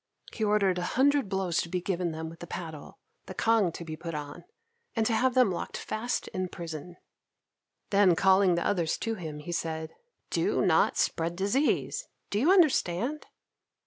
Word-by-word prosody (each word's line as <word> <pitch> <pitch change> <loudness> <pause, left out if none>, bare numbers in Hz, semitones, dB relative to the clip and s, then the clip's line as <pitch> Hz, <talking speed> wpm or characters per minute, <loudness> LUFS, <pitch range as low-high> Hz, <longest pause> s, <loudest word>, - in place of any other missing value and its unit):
He 220 - -3
ordered 200 -3 +2
a 175 - -3
hundred 280 -4 +3
blows 190 -3 -1
to 170 - -6
be 180 - -1
given 180 -1 -1
them 160 0 -5
with 165 0 -10
the 175 - -8
paddle, 160 -4 -7 0.3
the - - -7
cangue 225 -6 +3
to 170 - -7
be 155 -1 -5
put 165 0 -6
on, 145 -1 -7 0.5
and 225 -2 +1
to 225 - +1
have 250 +3 +2
them 250 -6 +5
locked 175 - -4
fast 230 +3 -3
in 185 0 -3
prison. 170 0 -8 0.9
Then, 195 -3 +5
calling 190 0 +4
the 170 - -1
others 175 -6 +1
to 225 - -2
him, 160 -7 -6
he 150 +4 -7
said, 160 -1 -3 0.4
"Do - - +1
not - - +3
spread 165 +1 0
disease! 260 - 0 0.2
Do 205 - +1
you 300 +10 +4
understand?" 295 - +2
185 Hz, 175 wpm, -29 LUFS, 165-220 Hz, 0.9 s, them